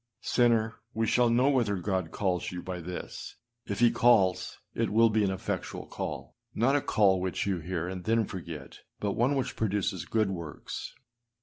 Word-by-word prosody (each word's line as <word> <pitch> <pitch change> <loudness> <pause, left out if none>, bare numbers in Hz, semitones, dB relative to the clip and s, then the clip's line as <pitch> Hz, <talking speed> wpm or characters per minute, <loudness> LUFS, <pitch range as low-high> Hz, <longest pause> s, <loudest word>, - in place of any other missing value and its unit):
Sinner, 115 -2 +2 0.2
we 110 0 +1
shall 120 +2 +3
know 120 +3 +4
whether 120 -7 +2
God 95 -2 -1
calls 90 -2 -1
you 90 -1 -6
by 90 -1 -5
this: 90 +2 -7 0.3
if 100 +3 -3
he 120 -1 +6
calls, 95 -6 +3 0.2
it - - 0
will 115 +1 +5
be 110 -1 +2
an 100 - +2
effectual 95 0 -4
call - - -5
â - - -20
not 130 +5 +4
a 145 - +3
call 95 -6 +3
which 95 -1 -1
you 95 -3 0
hear 85 +1 -3
and 90 -1 -5
then 115 +1 +2
forget 80 -8 -8 0.2
but 105 - -1
one 125 +7 +2
which 135 - -2
produces 100 -5 -1
good 110 +1 +1
works. 85 -5 -6
100 Hz, 185 wpm, -29 LUFS, 90-115 Hz, 0.3 s, he